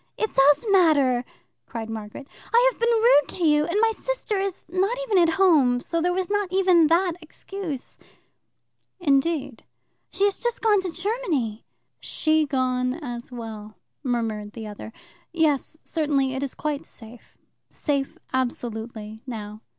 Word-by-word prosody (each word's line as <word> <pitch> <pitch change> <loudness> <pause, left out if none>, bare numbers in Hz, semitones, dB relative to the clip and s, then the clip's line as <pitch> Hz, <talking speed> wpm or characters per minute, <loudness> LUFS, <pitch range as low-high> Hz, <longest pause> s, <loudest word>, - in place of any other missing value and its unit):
"It 440 - -1
does 285 - +4
matter," 285 -10 +4 0.4
cried 225 -1 -5
Margaret. 220 +4 -7 0.3
"I 485 +2 +6
have - - -20
been 470 0 +2
rude 455 - +5
to 355 - -2
you; 300 -1 +4
and 345 +4 -1
my 455 0 +4
sister - - -3
is 390 -2 -3
not 385 +7 0
even 425 -6 +2
at 335 -2 +3
home, 295 -10 +4
so 335 +6 -2
there 355 +2 +2
was 365 0 -1
not 410 -2 -1
even 365 -4 +4
that 345 +3 +3
excuse. 320 -3 -7 1.0
"Indeed?" 280 -5 0 0.5
"She 395 - +2
has 405 - 0
just 480 -1 -2
gone 420 -3 +4
to 370 -2 -3
Germany." 340 - -2 0.3
"She 310 -1 +1
gone 255 -2 0
as 245 -6 -7
well," 220 -3 -8 0.3
murmured 225 -5 -2
the 225 -2 -7
other. 210 +1 -8 0.4
"Yes, 315 -2 +1
certainly, 285 -5 0
it 265 - -3
is 280 -2 -3
quite 300 -2 -3
safe 225 +1 -14 0.3
safe, 280 -3 -2 0.2
absolutely, 225 -4 -3
now." 215 -3 -7
300 Hz, 150 wpm, -24 LUFS, 245-375 Hz, 1.0 s, I